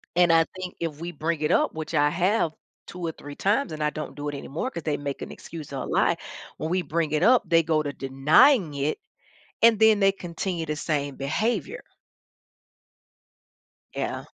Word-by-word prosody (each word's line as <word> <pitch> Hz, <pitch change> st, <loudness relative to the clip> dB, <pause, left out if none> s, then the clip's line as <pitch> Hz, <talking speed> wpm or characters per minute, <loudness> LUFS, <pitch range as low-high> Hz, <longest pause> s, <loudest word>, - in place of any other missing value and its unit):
and 175 Hz, -1 st, +5 dB
I 165 Hz, 0 st, +5 dB
think 185 Hz, -1 st, -6 dB
if 160 Hz, -3 st, -4 dB
we 170 Hz, +1 st, -5 dB
bring 160 Hz, 0 st, -2 dB
it 150 Hz, -, +1 dB
up, -, -, +2 dB
which 160 Hz, +1 st, -6 dB
I 145 Hz, -1 st, +4 dB
have 175 Hz, 0 st, +1 dB, 0.3 s
2 180 Hz, -, -9 dB
or 165 Hz, -, -1 dB
3 145 Hz, 0 st, -10 dB
times 205 Hz, -, +1 dB
and 155 Hz, 0 st, -6 dB
I 150 Hz, -, +2 dB
don't 155 Hz, -, -6 dB
do 145 Hz, 0 st, -5 dB
it 145 Hz, -, -5 dB
anymore 160 Hz, -, -4 dB
'cause 170 Hz, -, -6 dB
they 150 Hz, -2 st, -1 dB
make 140 Hz, -1 st, -5 dB
an -, -, -6 dB
excuse 155 Hz, -4 st, -9 dB
or 135 Hz, -, -3 dB
a -, -, -5 dB
lie, -, -, +2 dB, 0.4 s
when 160 Hz, -, -3 dB
we 185 Hz, +1 st, +1 dB
bring 165 Hz, -2 st, -1 dB
it 155 Hz, +3 st, +1 dB
up, 250 Hz, +2 st, +5 dB
they 165 Hz, -1 st, +4 dB
go 155 Hz, -1 st, +1 dB
to 145 Hz, -1 st, -4 dB
denying 150 Hz, -, +4 dB
it 140 Hz, +2 st, -1 dB, 0.6 s
and 225 Hz, -2 st, +6 dB
then 220 Hz, -1 st, +6 dB
they 195 Hz, 0 st, +5 dB
continue 175 Hz, -2 st, -4 dB
the 150 Hz, -, -3 dB
same 145 Hz, -3 st, -2 dB
behavior. 220 Hz, -, -2 dB, 2.1 s
Yeah. -, -, -3 dB
165 Hz, 195 wpm, -25 LUFS, 150-185 Hz, 2.1 s, and